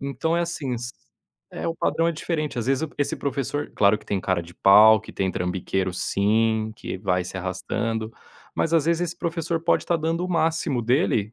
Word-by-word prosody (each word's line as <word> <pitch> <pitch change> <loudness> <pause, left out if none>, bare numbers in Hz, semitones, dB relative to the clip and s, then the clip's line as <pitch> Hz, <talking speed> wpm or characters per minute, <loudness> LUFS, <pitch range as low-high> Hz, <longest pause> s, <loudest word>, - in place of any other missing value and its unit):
Então 140 +4 -1
é - - +2
assim, 160 -7 -2
s 120 +1 -5 0.6
é, - - -4
o 165 - -2
padrão 165 +1 +1
é 170 - 0
diferente, 155 -4 -3
às 115 - -1
vezes 135 +4 +1
p - - -21
esse 145 - 0
professor 140 +1 -3
claro 105 +1 +4
que - - -20
tem 100 - -1
cara 90 -2 0
de 85 +1 -14
pau, 110 +3 +7
que - - -12
tem 95 -1 -1
trambiqueiro 90 +1 -2
sim, 110 +3 +1
que - - -5
vai 90 -2 0
se 95 +1 -7
arrastando, 110 +4 -3 0.4
mas 165 - 0
às 160 -2 +3
vezes 170 +1 +2
esse 175 -1 -3
professor 165 0 -2
pode 170 - +2
estar 170 - +1
dando 165 +2 -1
o 185 - -4
máximo 160 -5 0
dele 115 - +1
125 Hz, 205 wpm, -24 LUFS, 100-165 Hz, 0.6 s, pau